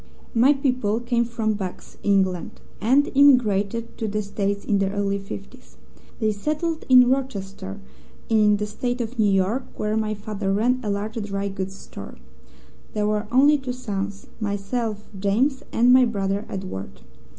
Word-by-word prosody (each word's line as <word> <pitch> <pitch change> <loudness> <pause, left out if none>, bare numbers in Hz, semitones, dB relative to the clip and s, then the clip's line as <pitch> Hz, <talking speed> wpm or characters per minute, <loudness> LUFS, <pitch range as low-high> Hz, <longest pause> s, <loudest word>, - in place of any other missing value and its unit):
"My 250 +5 +5
people 250 -6 0
came 235 0 0
from 225 -2 -1
Bucks, 190 -3 -7
England, 190 -3 +1 0.2
and 265 +7 +3
emigrated 230 -5 +3
to 220 - -1
the 210 0 -1
States 200 0 -2
in 200 -2 +2
the 195 -1 +1
early 200 0 -1
fifties. 65 - -10 0.4
They 215 -1 +2
settled 310 +9 -2
in 250 -1 +8
Rochester, 200 - -2 0.5
in 210 -2 +4
the 210 - -2
State 245 +4 -3
of 235 +1 -4
New 210 -2 +4
York, 195 +7 +1
where 210 0 -1
my 215 -1 0
father 205 -1 -3
ran 240 +6 +2
a 215 - -3
large 210 +3 -2
dry 200 -1 -3
goods 190 0 -5
store. - - -10 0.8
There 210 -1 +1
were 210 0 0
only 285 +4 +5
two 255 -2 -4
sons: 205 -5 -4
myself, 210 +1 -3
James, 240 +8 +1
and 245 +2 +5
my 255 0 +7
brother, 200 -2 -1
Edward. 95 - -6
210 Hz, 155 wpm, -23 LUFS, 200-245 Hz, 0.8 s, in